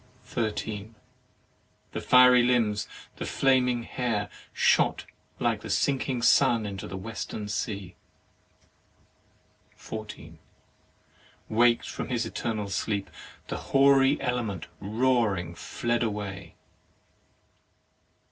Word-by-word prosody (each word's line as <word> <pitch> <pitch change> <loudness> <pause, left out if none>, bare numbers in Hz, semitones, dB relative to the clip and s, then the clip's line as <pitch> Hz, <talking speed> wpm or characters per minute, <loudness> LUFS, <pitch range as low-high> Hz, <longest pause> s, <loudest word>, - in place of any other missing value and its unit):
13. 110 -1 -4 1.0
The - - -4
fiery 125 0 +7
limbs, 115 -4 +1 0.3
the - - -4
flaming 125 -3 +2
hair 115 -5 -2 0.2
shot - - +2 0.3
like - - 0
the - - -8
sinking 130 -3 0
sun 115 -1 +4
into 100 -2 -5
the 95 - -6
Western 105 +1 -5
sea. 100 -3 -4 1.8
14. 110 -1 -9 1.1
WakM 120 +1 +4
from - - -5
his 120 -2 0
eternal 110 -2 -3
sleep, 100 -2 -2 0.4
the - - -3
hoary 135 +1 +4
element 115 -8 -2
roaring 105 -5 +1
fled 120 +6 -2
away. 100 -4 -4
115 Hz, 90 wpm, -27 LUFS, 105-125 Hz, 1.8 s, fiery